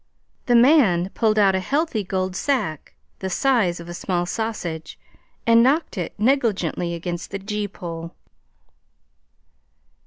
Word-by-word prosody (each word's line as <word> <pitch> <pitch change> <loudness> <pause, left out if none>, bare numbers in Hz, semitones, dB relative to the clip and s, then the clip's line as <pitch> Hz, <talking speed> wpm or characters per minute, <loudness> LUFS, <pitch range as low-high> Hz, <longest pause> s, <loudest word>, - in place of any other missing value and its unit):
The 245 - +4
man 235 - +5
pulled 215 +1 +1
out 200 -2 +5
a 190 - +1
healthy 275 - -1
gold 185 -1 -2
sack 190 - -2 0.2
the 190 - -3
size 215 -6 +1
of 170 - -9
a 175 - -6
small 175 0 -1
sausage 175 -6 -4 0.5
and 230 0 +6
knocked 280 +6 +2
it 180 -5 -4
negligently 210 - 0
against 175 +1 -5
the 195 - -4
gee 210 +1 -3
pole. 170 -4 -8
195 Hz, 130 wpm, -22 LUFS, 175-230 Hz, 0.5 s, and